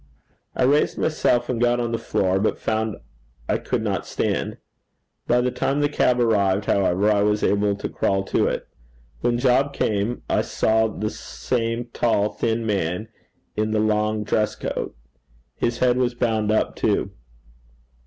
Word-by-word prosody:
I -, -, +1 dB
raised 145 Hz, +4 st, +3 dB
myself, 120 Hz, -6 st, +1 dB
and 120 Hz, -2 st, -2 dB
got 120 Hz, 0 st, +3 dB
on 120 Hz, -1 st, -1 dB
the 115 Hz, -, -1 dB
floor, 95 Hz, 0 st, 0 dB
but 105 Hz, -, 0 dB
found 110 Hz, -1 st, -1 dB, 0.5 s
I -, -, +1 dB
could -, -, -2 dB
not -, -, -2 dB
stand. -, -, -2 dB, 0.7 s
By 120 Hz, +1 st, +3 dB
the 125 Hz, +1 st, 0 dB
time 140 Hz, +3 st, -1 dB
the 145 Hz, -, +2 dB
cab 125 Hz, -4 st, +2 dB
arrived, 100 Hz, -4 st, +2 dB
however, 100 Hz, +1 st, +2 dB
I 100 Hz, -1 st, +3 dB
was 105 Hz, +1 st, +1 dB
able 100 Hz, 0 st, +2 dB
to 100 Hz, -, -4 dB
crawl 95 Hz, 0 st, 0 dB
to -, -, +1 dB
it. -, -, -3 dB, 0.5 s
When 120 Hz, 0 st, +1 dB
Job 130 Hz, +3 st, +2 dB
came, 105 Hz, +3 st, -1 dB
I -, -, +2 dB
saw 110 Hz, 0 st, +1 dB
the 110 Hz, 0 st, -3 dB
same 115 Hz, +1 st, -3 dB
tall 105 Hz, -3 st, +2 dB
thin 115 Hz, 0 st, -1 dB
man 100 Hz, 0 st, -1 dB, 0.5 s
in 110 Hz, 0 st, 0 dB
the 110 Hz, 0 st, +1 dB
long 105 Hz, 0 st, +1 dB
dress 105 Hz, 0 st, 0 dB
coat. -, -, -4 dB, 0.6 s
His 120 Hz, 0 st, -1 dB
head 125 Hz, -1 st, +2 dB
was 125 Hz, -1 st, 0 dB
bound 110 Hz, -3 st, 0 dB
up 110 Hz, -, +1 dB
too. -, -, 0 dB
110 Hz, 165 wpm, -23 LUFS, 105-120 Hz, 0.7 s, raised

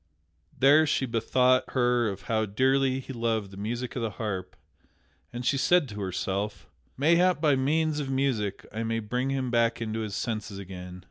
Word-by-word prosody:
Then 145 Hz, +4 st, +6 dB
she 135 Hz, -, +1 dB
bethought 125 Hz, +2 st, +2 dB
her 120 Hz, -3 st, +2 dB
of 100 Hz, -1 st, -7 dB
how 110 Hz, -1 st, 0 dB
dearly 130 Hz, +5 st, +2 dB
he 135 Hz, -, -8 dB
loved 115 Hz, -4 st, -1 dB
the 95 Hz, -, -11 dB
music 120 Hz, +5 st, -4 dB
of 125 Hz, -, -2 dB
the 115 Hz, -, -1 dB
harp, 95 Hz, -4 st, -5 dB, 0.8 s
and 120 Hz, +1 st, -6 dB
she 135 Hz, +2 st, +2 dB
said 175 Hz, 0 st, +3 dB
to 105 Hz, -1 st, -6 dB
herself: 100 Hz, +2 st, -3 dB, 0.3 s
"Mayhap 170 Hz, +5 st, +3 dB
by 150 Hz, -3 st, +3 dB
means 150 Hz, +3 st, +1 dB
of 140 Hz, -2 st, -3 dB
music 130 Hz, -7 st, -1 dB
I 110 Hz, -, -3 dB
may 115 Hz, 0 st, -1 dB
bring 125 Hz, +4 st, -2 dB
him 130 Hz, -2 st, -1 dB
back 115 Hz, -1 st, +2 dB
into 110 Hz, -1 st, -3 dB
his 105 Hz, -3 st, -4 dB
senses 110 Hz, -3 st, -3 dB
again." 90 Hz, -1 st, -8 dB
120 Hz, 180 wpm, -27 LUFS, 105-135 Hz, 0.8 s, Then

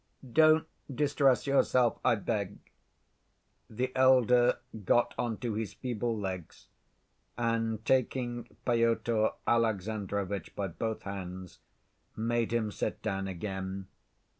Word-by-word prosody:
"Don't 155 Hz, 0 st, +6 dB, 0.3 s
distress 140 Hz, -1 st, +2 dB
yourself, 130 Hz, -3 st, +3 dB
I -, -, +4 dB
beg." 100 Hz, -1 st, -2 dB, 1.1 s
The 125 Hz, +4 st, -2 dB
elder 125 Hz, -2 st, +5 dB, 0.3 s
got 120 Hz, +5 st, +3 dB
on 120 Hz, -2 st, -2 dB
to 120 Hz, -3 st, -2 dB
his 110 Hz, -2 st, -4 dB
feeble 120 Hz, -2 st, -2 dB
legs, 95 Hz, -5 st, -6 dB, 0.7 s
and 115 Hz, -2 st, -1 dB
taking 120 Hz, -2 st, 0 dB, 0.2 s
Pyotr 115 Hz, -2 st, +2 dB, 0.2 s
Alexandrovitch 100 Hz, -4 st, -1 dB
by 100 Hz, -2 st, -2 dB
both 110 Hz, +6 st, -4 dB
hands, 95 Hz, -2 st, -7 dB, 0.6 s
made 115 Hz, +1 st, 0 dB
him 115 Hz, -3 st, 0 dB
sit -, -, -3 dB
down 95 Hz, 0 st, -2 dB
again. 95 Hz, 0 st, -5 dB
115 Hz, 105 wpm, -30 LUFS, 100-120 Hz, 1.1 s, Don't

